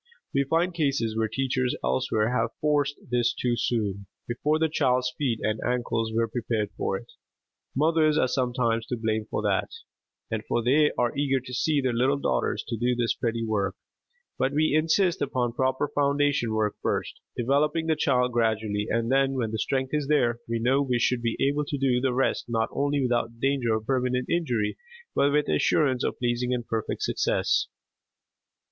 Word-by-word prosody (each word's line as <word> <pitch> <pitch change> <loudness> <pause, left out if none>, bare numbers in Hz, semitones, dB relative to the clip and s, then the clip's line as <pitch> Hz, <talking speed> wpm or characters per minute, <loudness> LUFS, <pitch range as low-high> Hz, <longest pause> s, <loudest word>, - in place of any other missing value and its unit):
We 140 0 +2
find 170 +5 +1
cases 140 -9 0
where 110 0 +1
teachers 130 +1 -1
elsewhere 105 - +1
have 115 -1 0
forced 145 -1 +1 0.2
this 120 -1 +2
too 120 -1 0
soon, 100 -5 -1 0.2
before 145 +6 0
the 160 0 +2
child's 125 -5 +1
feet 125 -6 -1
and 110 0 0
ankles 120 -2 -1
were 115 +1 +1
prepared 110 -2 -2
for 95 - -1
it. 115 - -13 0.6
Mothers 155 +1 +3
are 130 - +3
sometimes 125 -3 0
to 125 - -2
blame 110 -1 -1
for - - -2
that, - - +1 0.8
for 120 - 0
they 150 +5 +4
are 120 -1 +1
eager 140 -1 +1
to 125 0 -9
see 145 +3 +1
their 130 -2 0
little 130 +4 +2
daughters - - -1
do 120 +2 0
this 120 -2 +1
pretty 115 -1 -2
work; 100 -3 -1 0.6
but 130 +1 +1
we 155 0 +2
insist 165 +4 +2
upon 125 -4 -1
proper 130 +3 0
foundation 140 -4 +1
work 110 -1 0
first, - - -2 0.2
developing 145 +6 +1
the 160 -1 +2
child 125 -4 +2
gradually, 110 -3 0
and 115 +2 0
then, 135 0 +3
when 120 -5 -1
the 110 - -3
strength 130 +3 -1
is 150 -2 0
there, 120 -6 +2
we 115 - 0
know 130 +5 +2
we 130 -3 +1
should 120 +1 +1
be 115 -1 -1
able 145 +2 +1
to 145 - -3
do 130 -2 +1
the 130 -1 +1
rest 130 +2 0
not 115 -1 0
only 145 0 0
without 120 -2 -1
danger 130 -4 +1
of 110 0 -4
permanent 125 0 0
injury 125 -11 0 0.4
but 140 - +3
with 150 +1 +2
assurance 130 -5 +2
of - - -1
pleasing 125 +1 0
and 120 -1 -4
perfect 115 -1 -3
success. - - +1
125 Hz, 180 wpm, -26 LUFS, 115-140 Hz, 0.8 s, they